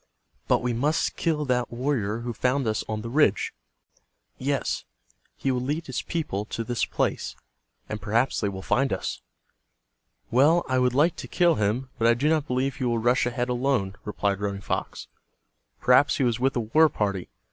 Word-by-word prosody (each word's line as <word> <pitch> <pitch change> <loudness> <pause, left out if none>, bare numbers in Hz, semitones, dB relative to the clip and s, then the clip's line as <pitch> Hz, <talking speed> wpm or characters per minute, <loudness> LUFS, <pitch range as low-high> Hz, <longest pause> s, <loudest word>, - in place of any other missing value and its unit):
But - - +2
we 125 -1 0
must 145 +7 0
kill 155 -3 0
that 125 -2 0
warrior 120 -4 -1
who 120 0 -4
found 130 +4 0
us 110 0 0
on 110 -1 -3
the 115 - -5
ridge. 130 - +2 0.9
Yes, - - -1 0.5
he 135 - 0
will 125 -1 0
lead 150 +6 -2
his 130 - -3
people 150 - -3
to 115 - -4
this 120 0 -1
place, - - -2 0.5
and 105 -1 -5
perhaps 115 +5 +1
they 105 - +1
will 95 -1 -7
find 135 +6 +1
us." - - -3 1.1
"Well, 150 +8 +4
I 130 0 +1
would 125 -1 +2
like 155 +5 +3
to - - -6
kill 175 -2 +3
him, 120 +2 -1
but 115 - +3
I 115 - +5
do 135 +6 0
not 155 -2 +1
believe 130 +1 -1
he 130 - -4
will 120 -1 +1
rush 120 +2 +2
ahead 120 0 -2
alone," 120 -6 0
replied 100 -1 -1
Running 100 -1 -2
Fox. - - -4 0.7
"Perhaps 125 +3 +4
he 140 - +1
was 120 -2 +1
with 135 +1 +1
a 120 - +1
war 155 +9 +4
party. 100 -7 -2
125 Hz, 185 wpm, -26 LUFS, 110-135 Hz, 1.1 s, I